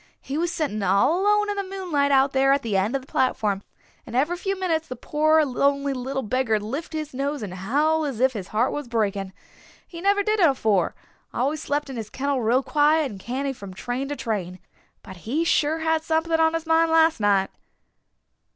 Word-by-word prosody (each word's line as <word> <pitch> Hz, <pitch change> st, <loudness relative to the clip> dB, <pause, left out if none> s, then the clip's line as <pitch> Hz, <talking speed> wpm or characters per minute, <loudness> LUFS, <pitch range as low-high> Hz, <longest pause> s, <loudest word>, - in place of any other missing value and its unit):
He 270 Hz, -, -6 dB
was 340 Hz, +2 st, 0 dB
sitting 280 Hz, -12 st, -2 dB
all 200 Hz, -, +2 dB
alone 420 Hz, +1 st, +3 dB
in 405 Hz, -, -4 dB
the 400 Hz, -, -1 dB
moonlight 295 Hz, -7 st, 0 dB
out 270 Hz, 0 st, +4 dB
there 270 Hz, 0 st, +3 dB
at 280 Hz, -, 0 dB
the 220 Hz, -4 st, -2 dB
end 200 Hz, +7 st, +1 dB
of 270 Hz, -, -2 dB
the -, -, -18 dB
platform, 210 Hz, -8 st, 0 dB, 0.4 s
and 235 Hz, -, -9 dB
every 300 Hz, +7 st, +1 dB
few 390 Hz, +2 st, -3 dB
minutes 325 Hz, -4 st, -1 dB
the 255 Hz, -, -6 dB
poor 310 Hz, +4 st, +2 dB
lonely 280 Hz, +1 st, +1 dB
little 265 Hz, +1 st, -3 dB
beggar'd 225 Hz, -2 st, 0 dB
lift 280 Hz, +11 st, -5 dB
his 310 Hz, -2 st, -4 dB
nose 280 Hz, 0 st, -2 dB
and 190 Hz, -3 st, -6 dB
howl 290 Hz, +12 st, +1 dB
as 275 Hz, -7 st, -3 dB
if 260 Hz, +1 st, +3 dB
his 195 Hz, -5 st, -6 dB
heart 230 Hz, +4 st, +1 dB
was 295 Hz, -3 st, -4 dB
breaking. 200 Hz, -4 st, -1 dB, 0.6 s
He 335 Hz, -1 st, -9 dB
never 400 Hz, +1 st, +2 dB
did 430 Hz, +1 st, 0 dB
it 340 Hz, -5 st, +6 dB
afore 215 Hz, -9 st, +1 dB, 0.4 s
always 280 Hz, +5 st, -1 dB
slept 290 Hz, +1 st, -2 dB
in 265 Hz, -2 st, -7 dB
his 220 Hz, -2 st, -5 dB
kennel 275 Hz, +1 st, -1 dB
real 240 Hz, +4 st, +2 dB
quiet 300 Hz, -1 st, +2 dB
and 200 Hz, -, -9 dB
canny 265 Hz, +6 st, -3 dB
from 200 Hz, -6 st, -10 dB
train 245 Hz, +6 st, -3 dB
to 290 Hz, -, -4 dB
train. 195 Hz, -8 st, -3 dB, 0.5 s
But 190 Hz, -3 st, -11 dB
he 255 Hz, -, -2 dB
sure 315 Hz, -1 st, +2 dB
had 320 Hz, 0 st, 0 dB
something 320 Hz, +1 st, -1 dB
on 320 Hz, 0 st, +3 dB
his 330 Hz, 0 st, -3 dB
mind 325 Hz, 0 st, +3 dB
last 325 Hz, -2 st, +4 dB
night." 200 Hz, -2 st, +2 dB
275 Hz, 205 wpm, -24 LUFS, 225-320 Hz, 0.6 s, it